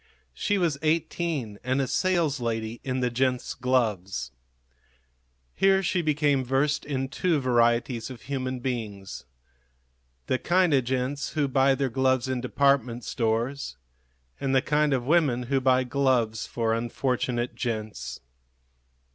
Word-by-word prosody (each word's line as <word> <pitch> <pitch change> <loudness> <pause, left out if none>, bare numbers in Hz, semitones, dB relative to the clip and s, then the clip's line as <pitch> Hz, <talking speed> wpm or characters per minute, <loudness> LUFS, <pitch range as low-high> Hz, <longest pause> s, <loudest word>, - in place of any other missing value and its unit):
She 205 - 0
was 165 -7 0
eighteen 155 -7 -1
and 130 +2 0
a - - +2
saleslady 125 - 0
in 130 -1 -2
the 125 -1 +1
gents' 125 +1 0
gloves. 110 -7 -1 1.2
Here 195 0 +3
she 180 0 +1
became 145 -3 +2
versed 135 +4 0
in 135 -2 -2
two 160 +3 0
varieties 120 -1 +1
of 125 -3 -10
human 130 -2 -3
beings 105 - -5 1.0
the 130 - 0
kind 180 -2 +3
of 130 -3 +3
gents 130 +3 -2
who 150 -3 +1
buy 135 0 +3
their 135 -1 0
gloves 130 +1 +1
in 130 -1 -1
department 125 -2 +1
stores 115 - -2 0.6
and 135 -1 0
the 130 - +5
kind 150 0 +2
of 130 -3 0
women 140 -5 +2
who 135 +2 0
buy 130 0 +3
gloves 125 -4 +1
for 115 -1 0
unfortunate 120 +1 -1
gents. 110 -3 -4
130 Hz, 130 wpm, -26 LUFS, 120-140 Hz, 1.2 s, the